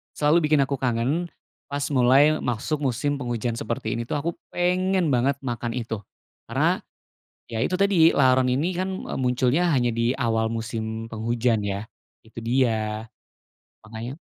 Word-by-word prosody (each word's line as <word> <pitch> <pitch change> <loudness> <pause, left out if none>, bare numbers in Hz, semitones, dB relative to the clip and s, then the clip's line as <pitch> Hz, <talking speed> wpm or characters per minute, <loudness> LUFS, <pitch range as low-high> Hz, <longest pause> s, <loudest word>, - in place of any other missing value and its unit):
selalu 150 +2 +3
bikin 150 -2 +4
aku 135 0 -3
kangen. 130 +8 0 0.4
Pas 145 0 -3
mulai 135 +4 +5
masuk 125 +6 -2
musim 140 +1 -1
penghujan 120 -2 -2
seperti 115 -1 -3
ini 115 - -3
tuh, - - -2
aku 170 +2 -1 0.2
pengen 180 0 +1
banget 130 +2 +2
makan 120 -3 -3
itu 115 -2 -3 0.5
karena, - - +2 0.7
ya 115 -1 -2
itu - - -2
tadi, 190 -5 +5
laron 130 -1 +4
ini 160 +8 0
kan, 185 +2 -1 0.2
eee, - - -4
munculnya 130 +7 +2
hanya 120 -3 +2
di 115 +1 +2
awal 115 -3 0
musim 115 0 -4
penghujan 115 0 0
ya, 100 +1 -3 0.4
itu 115 - -9
dia, 110 -3 0 0.8
makanya 115 +6 -7
125 Hz, 145 wpm, -24 LUFS, 115-145 Hz, 0.8 s, mulai